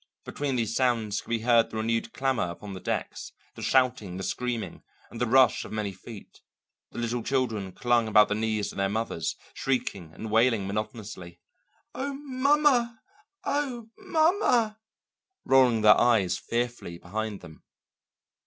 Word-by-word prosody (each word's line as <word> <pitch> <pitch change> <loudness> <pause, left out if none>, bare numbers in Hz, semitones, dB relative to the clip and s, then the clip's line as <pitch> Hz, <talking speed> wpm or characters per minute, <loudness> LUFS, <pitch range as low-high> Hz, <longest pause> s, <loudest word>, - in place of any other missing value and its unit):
Between 140 -2 -3
these 115 -2 -1
sounds 115 -5 +1
could - - -18
be 115 -1 0
heard 115 -1 +4
the 110 - -6
renewed 115 +1 -1
clamour 130 -9 -1
upon 100 +4 -8
the 95 - -7
decks, - - -4 0.2
the - - -10
shouting, 120 -8 +1
the 95 - -5
screaming, 120 +2 -3 0.3
and 120 - -8
the 125 - +2
rush 130 +2 +4
of - - -10
many 105 -2 -2
feet; 100 +3 -12 0.5
the - - -13
little 120 0 -2
children 115 -7 -1
clung 120 0 +1
about 105 -1 +6
the - - -1
knees 110 -1 -1
of - - -8
their 95 0 +1
mothers, 105 -6 -2 0.2
shrieking 100 -10 -2
and 110 -1 -7
wailing 115 -2 +3
monotonously, 105 -4 -6 0.5
"Oh, 280 +1 -3
ma_ma_ 270 -3 +2 0.5
oh, 250 -6 -2
ma_ma_!" 310 - +2 0.7
rolling 125 -4 +4
their 105 0 +6
eyes 115 -7 +3
fearfully 120 -7 -3
behind 105 +3 -5
them. 80 -1 -13
115 Hz, 150 wpm, -27 LUFS, 105-130 Hz, 0.7 s, about